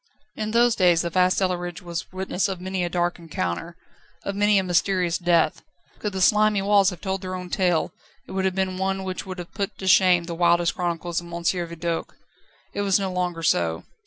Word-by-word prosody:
In 215 0 -3
those 235 +1 +4
days 175 -4 +4
the 170 - -3
vast 185 +1 +3
cellarage 175 -2 -1
was 170 -1 -5
witness 185 +1 -1
of 190 -2 -4
many 185 0 -2
a 175 - -1
dark 175 0 -1
encounter, 165 - -4 0.5
of 200 - -3
many 205 0 +3
a 190 - +2
mysterious 180 -1 +1
death; 170 -3 +2 0.4
could 210 - -2
the 190 -1 -3
slimy 210 +1 +4
walls 200 -1 +4
have 180 -4 -9
told 190 -1 -2
their 185 -1 -4
own 180 -1 -7
tale, 175 -4 +1 0.4
it - - -10
would 190 0 -1
have 190 -1 0
been 190 -1 -1
one 190 0 -1
which 185 0 -5
would 185 0 -6
have 175 -1 -8
put 200 -1 -3
to 190 - -7
shame 185 -2 +5
the 170 0 -5
wildest 170 0 +3
chronicles 175 -1 -2
of 170 - -12
M. 170 0 -5
Vidoq. 170 -1 -1
Now - - -26 0.6
it 205 - -2
was 200 -1 +2
no 190 -1 -2
longer 175 -2 -2
so. 85 - +1
180 Hz, 215 wpm, -24 LUFS, 170-190 Hz, 0.6 s, shame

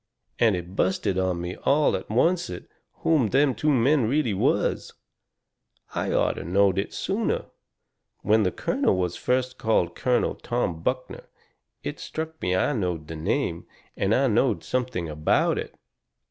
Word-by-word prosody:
And 110 -4 +4
it 90 +1 -7
busted 95 0 0
on 95 -2 0
me 90 +1 -4
all 150 +2 +2
at 95 - -6
oncet 145 - 0 0.4
who 150 -9 +3
them 135 +2 +3
two 150 +7 0
men 135 -1 +3
really 140 -5 +1
was. 95 - 0 1.0
I - - -1
orter - - +1
knowed 95 +2 +2
it 100 - -3
sooner. 210 +3 -1 0.8
When 110 +1 +4
the 95 -3 +1
colonel 95 - 0
was 90 -1 -1
first 130 0 -1
called 110 -6 +1
Colonel 125 -1 +1
Tom 95 -9 -2
Buckner 130 +6 -3 0.6
it - - -5
struck 160 0 -6
me 90 0 +1
I 95 +10 +1
knowed 90 - -2
the 80 - -5
name, 80 +1 -2 0.3
and - - 0 0.2
knowed - - +2
something 125 -9 -2
about 75 0 +1
it. - - -7
110 Hz, 145 wpm, -25 LUFS, 90-130 Hz, 1.0 s, And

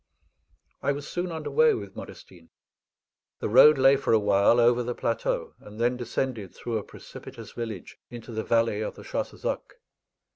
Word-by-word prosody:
I 140 - +1
was 140 0 -7
soon 175 0 -3
under 160 -2 -5
way 470 -2 +4
with - - -8
Modestine. - - -12 0.9
The - - -3
road 150 -1 +8
lay 135 +1 +6
for 135 - 0
a 110 - +5
while 100 +3 +4
over 120 +1 +4
the 120 0 -3
plateau, 115 - -2
and 105 +1 -13
then 120 +2 +2
descended 120 -4 -4
through 115 -2 -3
a - - -8
precipitous - - -11
village 110 -6 -7
into 120 0 -9
the 110 -1 -3
valley 115 -2 +1
of 110 - -4
the - - -12
Chassezac. - - -4
120 Hz, 170 wpm, -26 LUFS, 110-135 Hz, 0.9 s, road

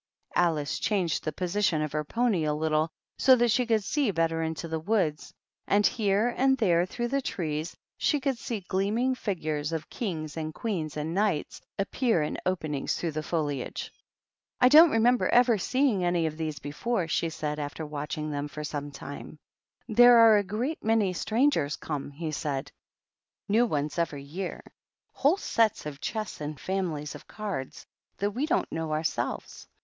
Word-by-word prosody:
Alice 160 -4 +1
changed 185 -7 0
the 155 - -2
position 180 0 0
of 150 - -3
her 150 0 -1
pony 220 0 +1
a 150 0 0
little 155 +1 +1 0.3
so 260 - +7
that 240 -1 +2
she 250 +1 +2
could 220 -3 +2
see 280 +4 +1
better 165 -3 0
into 160 0 -3
the 160 0 -2
woods, 165 -4 0 0.4
and 205 +1 +3
here 215 +2 +2
and 265 0 +3
there 180 -6 +3
through 240 +4 -3
the 275 +2 0
trees 160 - -3 0.2
she 295 - +2
could 270 -1 0
see 225 -4 -4
gleaming 205 +8 0
figures 155 -10 -2
of 160 -1 -4
Kings 160 -9 -4
and 155 -1 -4
Queens 170 -10 -3
and 155 +2 -3
Knights 195 -5 0 0.2
appear 200 - +1
in 150 - -3
openings 155 -6 -1
through 170 - -2
the 155 +1 -3
foliage. 150 -5 -3 0.7
"I 250 - +6
don't 320 +4 +9
remember 240 0 +3
ever 240 -3 +4
seeing 255 -3 +1
any 175 -1 +1
of 155 -1 -2
these 155 -2 -3
before," 165 +8 -2
she 165 0 0
said, 150 -1 -4
after 150 +2 -4
watching 150 +1 -4
them 145 0 -3
for 150 +1 -7
some 145 -1 -4
time. 145 +2 -9 0.3
" - - -46
There 245 0 +9
are 225 -2 +8
a 205 - +2
great 230 - -3
many 215 -4 +2
strangers 215 - +1
come," 145 -3 -5
he 155 +2 -5
said; 145 -2 -3 0.4
" - - -66 0.3
new 230 +4 +3
ones 150 -2 -2
every 150 -4 -2
year; 175 +7 -5 0.5
whole 295 +7 +3
sets 225 - +1
of 145 -2 -7
chess 215 -7 -4
and 150 -1 -5
families 170 -6 -2
of - - -12
cards 200 -11 -5 0.3
that 205 +1 0
we 260 +8 -2
don't 350 +2 0
know 160 -1 -2
ourselves. 155 0 -3
175 Hz, 175 wpm, -28 LUFS, 155-225 Hz, 0.7 s, don't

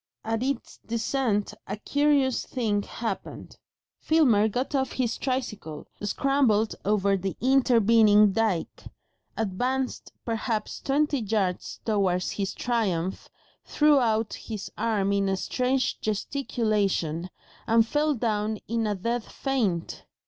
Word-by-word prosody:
At 225 0 -1
its 265 -1 -3
descent 230 -2 -1
a - - -4
curious 285 +1 +2
thing 215 -5 -1
happened. 230 +3 -6 0.4
Filmer 250 -10 +4
got 250 +7 -2
off 265 -2 0
his 245 -3 -1
tricycle, 215 - -4 0.2
scrambled 225 0 +2
over 200 -1 +2
the 195 0 -3
intervening 225 -5 +5
dyke, 205 -4 -1 0.6
advanced 250 +6 -2
perhaps 225 -1 -2
twenty 290 +1 +1
yards 200 -5 -2
towards 190 -5 +1
his 195 -2 -3
triumph, 190 -7 -1 0.3
threw 300 -1 +4
out 220 -3 +1
his 215 -4 -6
arms 200 -3 0
in 195 -1 +1
a 190 - 0
strange 255 +5 -1
gesticulation, 210 - -1 0.4
and 225 0 +4
fell 295 +4 +1
down 215 -2 -1
in 230 0 0
a 205 - 0
dead 235 +5 -2
faint. 220 -14 -2
225 Hz, 115 wpm, -26 LUFS, 205-255 Hz, 0.6 s, intervening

